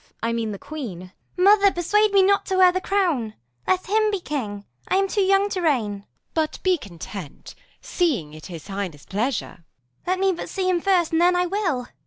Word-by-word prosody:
I 230 0 0
mean 225 -2 -2
the 200 - -5
queen. 250 - -7
P. 185 - -9 0.3
Edw. 360 - +1
Mother, 400 0 +6
persuade 415 +5 +2
me 395 -1 +5
not 400 +1 +3
to 380 - 0
wear 365 -1 +7
the 370 +1 -2
crown: 335 - 0 0.3
Let 370 0 +1
him 430 +2 +2
be 405 -2 -1
king; 215 - -4 0.2
I - - +1
am 390 0 +2
too 405 - 0
young 390 +1 +3
to 375 -2 -2
reign. 260 -11 +1
Q. 200 - -6
Isab. - - -31 0.3
But 315 -1 -1
be 370 -2 +2
content, 175 - -9 0.3
seeing 255 - -1
'tis 155 0 -11
his 165 -2 -9
highness' 195 -7 -5
pleasure. 225 +5 -2
P. - - -26
Edw. - - -32 0.5
Let 370 - 0
me 385 0 +3
but 345 - -5
see 380 -2 -2
him 360 -2 +1
first, 360 -4 +2
and 325 0 +2
then 355 +1 +4
I 355 0 +2
will. 350 -10 -1
345 Hz, 230 wpm, -23 LUFS, -, 0.5 s, wear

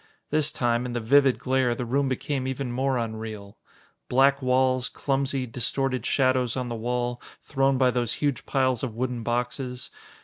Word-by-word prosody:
This 150 -1 +2
time, 120 0 0
in 120 - -5
the 120 - -1
vivid 135 +3 +4
glare, 130 -2 +1
the 125 - -4
room 135 +3 +1
became 130 +1 -2
even 130 -1 -3
more 130 +1 0
unreal. 110 -3 -5 0.5
Black 135 +2 +4
walls, 130 -1 +2
clumsy, 135 -1 -1
distorted 130 +1 -1
shadows 130 -2 +2
on 125 -1 -2
the 120 - -3
wall, 120 +1 -2 0.2
thrown 135 -1 +1
by 130 -1 +4
those 120 -1 -1
huge 145 -3 -2
piles 130 -3 +1
of 120 -4 -4
wooden 125 0 -2
boxes. 125 +2 -3
125 Hz, 165 wpm, -26 LUFS, 120-135 Hz, 0.5 s, vivid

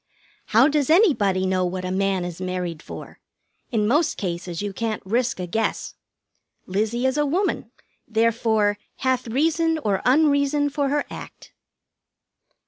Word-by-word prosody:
"How 235 +5 +5
does 295 -2 +1
anybody 230 - +4
know 185 0 +1
what 185 +1 -3
a 185 - -3
man 190 -1 0
is 175 0 -7
married 180 -3 -3
for? - - -10 0.5
In 215 -3 +1
most 300 +7 +2
cases 175 -2 -4
you 205 -1 -3
can't 220 0 -3
risk 235 +2 0
a 180 - -2
guess. 220 +6 -2 0.7
Lizzie 220 +6 -1
is 260 +2 +1
a 295 - +2
woman, 370 +8 -1 0.4
therefore 220 -2 +1 0.2
'hath 260 -2 -1
reason 320 +6 +1
or 205 -10 -1
unreason 285 +1 +3
for 280 0 0
her 290 +1 0
act.'" - - -10
225 Hz, 140 wpm, -23 LUFS, 190-285 Hz, 0.7 s, How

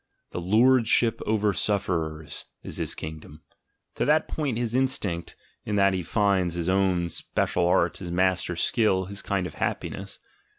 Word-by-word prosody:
The - - -4
lordship 115 +3 +3
over 105 -1 +2
sufferers 85 -7 -2 0.2
is - - -7
his - - -3
kingdom, 75 0 -9 0.5
to - - -1
that 155 +1 +3
points 140 -7 -2
his 120 -2 -2
instinct, 120 -10 0 0.3
in 105 - -2
that 100 -1 +4
he 95 - -1
finds 95 -2 +1
his 85 0 -1
own 95 -2 +2
spe 85 - -6
cial 90 -1 +1
art, 85 -1 +2
his 90 - -6
master 90 0 +1
skill, 95 0 +1
his 100 +2 -7
kind 100 -3 -1
of - - -6
happiness. - - -4
95 Hz, 160 wpm, -26 LUFS, 85-110 Hz, 0.5 s, that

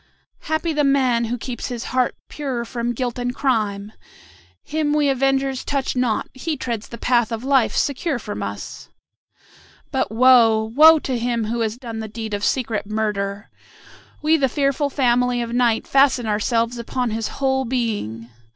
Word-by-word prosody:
"Happy 315 +1 -1
the 295 -1 +1
man 260 -4 +2
who 240 +2 -2
keeps 240 0 -5
his 245 -2 -5
heart 255 -1 +1
pure 260 -5 -4
from 235 0 -3
guilt 245 0 -3
and 245 0 -2
crime! 210 -6 -1 0.7
Him 300 -1 -1
we 295 -1 +2
avengers 270 0 +1
touch 275 -2 -2
not; 250 -3 0
he 300 +4 -3
treads 235 -4 -4
the 235 - -9
path 240 -2 +1
of 225 +1 -4
life 265 -3 +2
secure 280 +1 0
from 210 -3 -6
us. 100 0 -6 1.0
But - - -1
woe! 230 -2 +5
woe! 315 +4 +8
to 260 -5 -2
him 235 -1 -1
who 235 +2 -2
has 225 0 -1
done 230 -3 -7
the 220 - -5
deed 220 0 -6
of 205 0 -3
secret 225 -5 -1
murder. 205 -2 -3 0.7
We 315 +1 +4
the 270 -3 +1
fearful 280 +2 0
family 250 -2 +1
of 235 0 -3
Night 240 -2 +2
fasten 270 -3 +3
ourselves 230 +3 0
upon 245 0 -2
his 225 0 -2
whole 265 -1 +1
being. 215 - -3
245 Hz, 165 wpm, -21 LUFS, 225-270 Hz, 1.0 s, woe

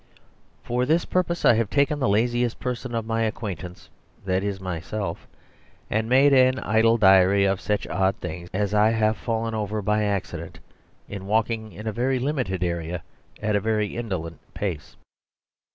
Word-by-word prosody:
For 125 +1 -1
this 165 +3 +2
purpose 175 -1 -1
I - - +7
have 110 -2 0
taken 145 +1 +1
the 130 - +1
laziest 120 +3 +1
person 125 -1 -4
of 115 -1 -2
my 115 0 -1
acquaintance, 100 -5 -4 0.4
that 95 0 0
is 100 -1 -2
myself; 90 +1 -4 0.6
and 110 +1 0
made 135 +3 +5
an 130 0 +5
idle 115 0 +3
diary 95 -1 +5
of 95 -1 0
such 105 -1 -1
odd 95 0 +1
things 85 0 -7
as 100 +1 -1
I 105 +1 +5
have 110 -1 +2
fallen 115 -1 -2
over 110 -1 -2
by 105 +1 +1
accident, 90 -5 -3 0.5
in 100 -1 -7
walking 110 0 0
in 105 +5 -10
a 110 - -1
very 130 +4 0
limited 125 - -1
area 85 -1 -3 0.4
at 105 -1 +1
a - - +3
very 105 -1 -1
indolent 95 -8 -4 0.2
pace. 85 -8 -4
105 Hz, 165 wpm, -24 LUFS, 95-115 Hz, 0.6 s, I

